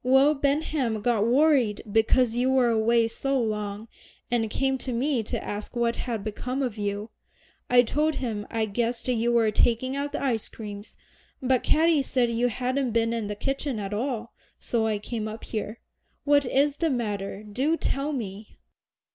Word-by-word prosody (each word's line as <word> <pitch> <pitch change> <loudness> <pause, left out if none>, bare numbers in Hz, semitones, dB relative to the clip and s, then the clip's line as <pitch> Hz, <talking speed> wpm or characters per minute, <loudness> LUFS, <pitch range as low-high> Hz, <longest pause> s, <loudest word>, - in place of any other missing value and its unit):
Will 265 +4 +5
Benham 280 -5 0
got 225 -3 +2
worried 260 -4 +3
because 225 +2 +3
you 250 +2 +2
were 260 -2 +4
away 230 +1 +3
so 275 +4 -1
long, 210 -1 -3 0.4
and 225 -2 +1
came 265 +3 0
to 255 - -4
me 250 +1 +1
to 215 - -4
ask 205 +4 -5
what 235 -1 +1
had 230 -5 -3
become 250 +5 -3
of 245 -5 -2
you. 205 +1 -3 0.6
I 245 0 +6
told 300 +5 0
him 220 -5 -3
I 225 -1 0
guessed 235 +3 -2
you 240 -1 +1
were 230 -2 +3
taking 240 +5 +1
out 285 +1 -2
the 295 - -3
ice 235 -6 0
creams, 205 -1 -9 0.4
but 255 -1 +2
Katy 320 -1 +3
said 250 -3 +1
you 235 +1 +1
hadn't 255 +1 -1
been 230 0 +2
in 225 -3 -2
the 210 - -4
kitchen 270 +2 -2
at 200 -1 -4
all, 235 0 -3 0.3
so 225 -2 0
I 215 -1 0
came 215 +1 -4
up 220 +1 -7
here. 215 0 -4 0.4
What 285 -2 +3
is 280 +3 +2
the 330 0 +1
matter 205 -5 -3
do 265 +10 0
tell 280 0 -1
me?" 210 -6 -6
235 Hz, 175 wpm, -26 LUFS, 220-265 Hz, 0.6 s, I